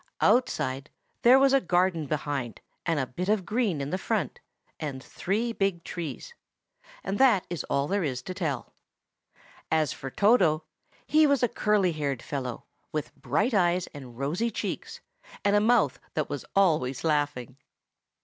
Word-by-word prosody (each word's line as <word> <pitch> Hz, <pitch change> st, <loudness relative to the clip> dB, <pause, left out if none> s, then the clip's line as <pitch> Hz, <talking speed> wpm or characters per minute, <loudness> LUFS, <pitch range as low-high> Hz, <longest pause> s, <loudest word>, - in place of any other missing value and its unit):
Outside 150 Hz, -, +1 dB, 0.3 s
there 250 Hz, +2 st, +7 dB
was 270 Hz, 0 st, +4 dB
a 275 Hz, -, +5 dB
garden 175 Hz, -, +1 dB
behind 140 Hz, -5 st, -3 dB, 0.3 s
and 165 Hz, -3 st, +1 dB
a 135 Hz, -, 0 dB
bit 180 Hz, +10 st, -4 dB
of 210 Hz, -4 st, +2 dB
green 210 Hz, -, 0 dB
in 140 Hz, +6 st, -2 dB
front, 195 Hz, -, -2 dB, 0.4 s
and 135 Hz, -4 st, -5 dB
three 225 Hz, +5 st, -2 dB
big 195 Hz, -5 st, -1 dB
trees; 175 Hz, -, -6 dB, 0.7 s
and 195 Hz, -, -2 dB
that 245 Hz, -9 st, +5 dB
is 175 Hz, -, -2 dB
all 140 Hz, +1 st, 0 dB
there 200 Hz, +2 st, 0 dB
is 130 Hz, -4 st, -2 dB
to 185 Hz, -, -5 dB
tell. 155 Hz, -9 st, -3 dB, 1.0 s
As 155 Hz, -3 st, +2 dB
for 135 Hz, -, -7 dB
Toto, 180 Hz, -, +3 dB, 0.4 s
he 310 Hz, 0 st, +5 dB
was 280 Hz, -3 st, +2 dB
a -, -, +5 dB
curly 210 Hz, -5 st, +2 dB
haired 140 Hz, -5 st, -3 dB
fellow, 130 Hz, -4 st, -4 dB, 0.3 s
with 150 Hz, -2 st, -4 dB
bright 200 Hz, -, 0 dB
eyes 180 Hz, -2 st, +2 dB
and 130 Hz, -5 st, -10 dB
rosy 160 Hz, -, -1 dB
cheeks, 220 Hz, -, -5 dB, 0.4 s
and 200 Hz, 0 st, +4 dB
a 205 Hz, -, +4 dB
mouth 220 Hz, -, +3 dB, 0.2 s
that 155 Hz, -2 st, -1 dB
was 145 Hz, -, -4 dB
always 155 Hz, -10 st, +2 dB
laughing. 145 Hz, -5 st, -1 dB
170 Hz, 155 wpm, -27 LUFS, 140-210 Hz, 1.0 s, there